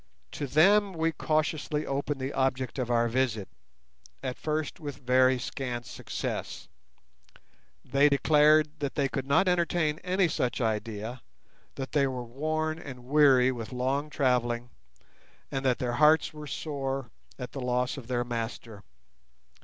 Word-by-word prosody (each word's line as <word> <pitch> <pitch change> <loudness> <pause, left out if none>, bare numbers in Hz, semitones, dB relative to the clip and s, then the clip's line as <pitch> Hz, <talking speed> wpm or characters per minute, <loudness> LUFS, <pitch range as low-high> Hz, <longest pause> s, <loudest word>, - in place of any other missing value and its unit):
To 145 - -4
them 195 +8 +4
we 165 -1 0
cautiously 155 -1 -1
opened 140 +1 -2
the 130 +1 -3
object 130 -1 -1
of 125 -2 -2
our 120 -1 +3
visit, 115 -4 0 0.8
at 130 -2 -3
first 155 -1 -3
with 145 -4 -6
very 130 0 +3
scant 125 -2 -4
success. 105 - -5 1.2
They 140 +3 +4
declared 150 +1 +4
that 140 -2 -3
they 140 -2 +2
could 135 0 -4
not 140 +7 +3
entertain 170 -3 +1
any 185 0 +1
such 125 -5 -1
idea, 110 +1 -3 0.5
that 135 -1 -5
they 140 -2 +3
were 130 -2 -4
worn 155 +5 -2
and 130 -6 -9
weary 135 -2 +5
with 115 -2 -6
long 135 +4 -1
travelling, 120 -4 0 0.8
and 135 0 -2
that 125 -2 +3
their 120 -1 -2
hearts 155 +4 +4
were 150 -1 -8
sore 135 -5 -4 0.3
at 125 -2 -6
the 135 - -6
loss 125 0 0
of 135 -5 -9
their 120 -1 0
master. 115 -3 -5
135 Hz, 145 wpm, -28 LUFS, 125-150 Hz, 1.2 s, weary